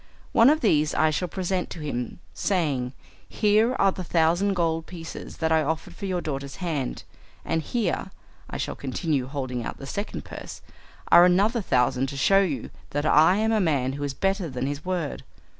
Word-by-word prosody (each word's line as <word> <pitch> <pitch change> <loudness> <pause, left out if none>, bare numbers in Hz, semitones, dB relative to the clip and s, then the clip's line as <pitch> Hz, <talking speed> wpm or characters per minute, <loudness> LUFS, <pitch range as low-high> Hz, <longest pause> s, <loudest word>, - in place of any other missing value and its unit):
One 230 +3 +6
of 310 +1 +3
these 155 -9 +2
I 155 0 +3
shall 180 +4 -1
present 185 0 -2
to - - -8
him 125 -6 -4 0.2
saying, 140 -10 0 0.4
"Here 215 +4 +3
are 195 -5 +3
the 185 - -6
thousand 175 +4 +2
gold 165 -2 0
pieces 165 -3 -8
that 160 0 0
I 160 -1 +4
offered 160 +4 -3
for 195 - -6
your 180 -2 -1
daughter's 140 -3 -4
hand, 155 -8 -3 0.4
and 165 0 0
here," 185 +1 -1 0.4
I - - -5
shall - - -3
continue, 135 0 -2
holding 130 -3 -3
out - - -5
the 135 - -9
second 200 +9 -5
purse, - - -9 0.5
"are 175 - +9
another 200 +6 +3
thousand 125 -4 +1
to 140 - -6
show 195 +8 +5
you 165 -8 -2 0.2
that 145 +1 -2
I 155 +4 +6
am 220 +2 +1
a 220 -2 +3
man 140 -7 +1
who 145 +1 -5
is 140 -1 -3
better 195 -1 0
than 130 0 -3
his 145 +2 -3
word." 175 - -3
160 Hz, 190 wpm, -25 LUFS, 140-190 Hz, 0.5 s, are